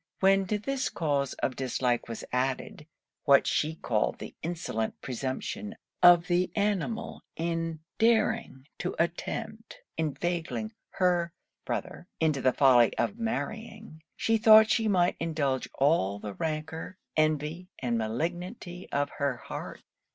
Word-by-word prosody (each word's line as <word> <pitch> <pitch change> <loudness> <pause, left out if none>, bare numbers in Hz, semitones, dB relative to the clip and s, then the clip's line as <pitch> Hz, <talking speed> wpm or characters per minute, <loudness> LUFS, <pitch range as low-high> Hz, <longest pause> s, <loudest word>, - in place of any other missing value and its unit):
When 195 0 +4
to 210 - 0
this 270 +5 -2
cause 140 -4 0
of 130 - 0
dislike 125 -1 0
was 115 - -6
added, 130 +4 -2 0.4
what 140 -2 +6
she 155 +1 0
called - - 0
the - - -8
insolent 160 -10 -3
presumption 135 - -4 0.3
of 175 -1 +8
the 180 0 +1
animal 210 +1 -1
in 165 -1 -2 0.2
daring 225 - +2
to - - -3
attempt - - -3 0.2
inveigling 175 +7 -2 0.2
her 175 -2 +1 0.3
brother 175 - -4
into 155 -4 +1
the 130 - +4
folly 125 -4 +5
of 210 +3 -1
marrying, 220 -5 -4
she 225 0 +1
thought 220 0 +8
she 225 -1 +2
might 180 -3 +2
indulge 145 -5 -1
all 135 - +2
the 100 0 -6
rancour, 160 - -4 0.2
envy, 155 +3 0
and 120 -3 -1
malignity 175 - -4
of 145 +1 0
her 140 -3 0
heart. - - -7
165 Hz, 130 wpm, -29 LUFS, 140-195 Hz, 0.4 s, of